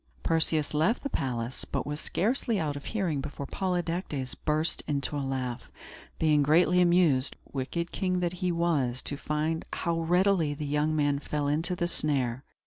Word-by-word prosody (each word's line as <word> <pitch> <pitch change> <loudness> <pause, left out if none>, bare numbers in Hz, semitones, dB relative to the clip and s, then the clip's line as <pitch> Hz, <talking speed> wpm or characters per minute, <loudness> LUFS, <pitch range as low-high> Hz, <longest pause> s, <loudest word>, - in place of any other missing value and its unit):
Perseus 160 -2 +1
left 160 +11 +2
the 280 - -3
palace, 125 -2 -2
but - - -3
was 150 +1 -4
scarcely 230 +2 0
out 150 -3 -1
of 140 - -7
hearing 180 -10 -1
before 140 0 -6
Polydectes 175 -6 -2
burst 155 +1 0
into 145 0 -1
a 145 - -1
laugh; 130 -3 -3 0.5
being 155 -2 +3
greatly 175 +5 +4
amused, 170 -7 +3 0.2
wicked 170 +6 -3
king 185 -2 0
that 175 -1 0
he 180 -1 +1
was, 150 -8 0
to 145 - -1
find 155 +2 -1
how 170 -1 -1
readily 175 -2 +2
the 150 0 -4
young 150 +2 +1
man 145 -2 +2
fell 145 0 -2
into 160 +5 0
the 175 0 0
snare. 135 -6 0
155 Hz, 165 wpm, -29 LUFS, 145-175 Hz, 0.5 s, greatly